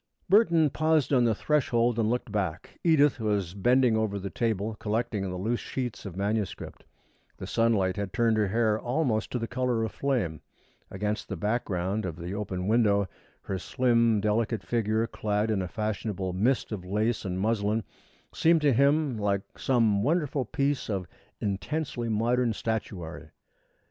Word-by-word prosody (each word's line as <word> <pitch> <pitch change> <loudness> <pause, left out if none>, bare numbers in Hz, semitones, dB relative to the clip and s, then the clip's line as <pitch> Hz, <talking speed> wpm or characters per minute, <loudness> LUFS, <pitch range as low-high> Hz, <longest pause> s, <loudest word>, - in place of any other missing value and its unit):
Burton 170 -7 +4
paused 155 -3 +2
on 125 -2 +4
the 115 -2 +2
threshold 120 -4 +1
and 110 -1 +2
looked 120 -2 -2
back. 95 -5 -3
Edith 150 -5 +4
was 100 -5 -1
bending 120 +4 +3
over 110 -2 0
the 100 0 -5
table, 110 -2 -1
collecting 110 -1 -1
the 90 - -4
loose 115 +6 -1
sheets 125 -6 -4
of 90 - -8
manuscript. 105 +1 -3 0.5
The - - -6
sunlight 105 -5 +1
had 100 -2 -3
turned 115 +1 +2
her 105 -2 +2
hair 110 +1 +1
almost 120 -3 0
to - - -2
the 115 -1 -3
color 125 -2 0
of 110 - -2
flame. 115 - -1 0.5
Against 105 +2 -3
the 100 - -3
background 100 -1 -1
of 85 - -5
the 85 +3 -6
open 95 -3 -3
window, 105 -3 +3 0.4
her 95 -1 -3
slim, 115 -2 +2
delicate 110 +1 0
figure, 110 -1 0
clad 105 -1 -1
in 100 -3 +1
a 90 - -3
fashionable 105 -3 -3
mist 115 +9 +1
of 100 -4 -4
lace 105 +5 0
and 95 -2 -3
muslin, 105 +1 0 0.5
seemed 165 0 +3
to 145 -3 +4
him 140 -1 +2
like 100 -1 0 0.2
some 115 -6 +2
wonderful 145 - 0
piece 140 +2 -1
of 95 -3 -2 0.3
intensely 120 +4 -2
modern 115 +2 +1
statuary. 95 -8 -4
110 Hz, 160 wpm, -28 LUFS, 100-125 Hz, 0.5 s, Burton